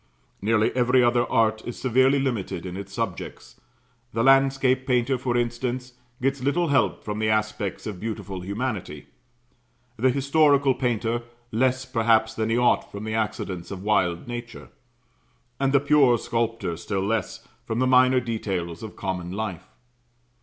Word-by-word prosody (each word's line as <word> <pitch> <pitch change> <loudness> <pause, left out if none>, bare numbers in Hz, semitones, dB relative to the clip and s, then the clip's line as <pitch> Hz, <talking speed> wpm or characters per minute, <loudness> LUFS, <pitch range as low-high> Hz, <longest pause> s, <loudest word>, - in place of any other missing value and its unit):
Nearly 110 +2 +2
every 125 0 +4
other 120 0 +2
art 110 -1 +2
is 120 - -6
severely 130 +2 +3
limited 115 -10 -2
in 90 -1 -6
its 100 0 -7
subjects 100 -4 -6 0.5
the 115 - 0
landscape 135 -1 +3
painter, 125 +1 +2
for 125 -1 -1
instance, 120 +1 -2 0.3
gets 135 +1 0
little 160 +5 +1
help 140 -2 +1
from 105 0 -4
the 110 0 +1
aspects 110 -2 -1
of 105 -4 -5
beautiful 100 -4 -5
humanity; 100 - -4 0.9
the 130 +4 +3
historical 140 +1 +3
painter, 120 -2 -1 0.3
less, 130 +3 +1
perhaps, 115 -3 +2
than 110 0 -2
he 115 - +2
ought, 125 0 +2
from 100 +1 -7
the 110 0 -4
accidents 100 -5 -3
of 95 -1 -7
wild 95 -4 +1
nature; 120 -1 -7 0.9
and 135 0 +1
the 140 - +5
pure 140 -3 +4
sculptor, 115 -6 -2
still 95 +2 -2
less, 110 -2 -2 0.2
from 110 - -2
the 130 - +2
minor 130 0 +5
details 95 -8 -3
of 110 -2 -8
common 90 -2 -4
life. 95 -4 -5
115 Hz, 150 wpm, -25 LUFS, 105-130 Hz, 0.9 s, the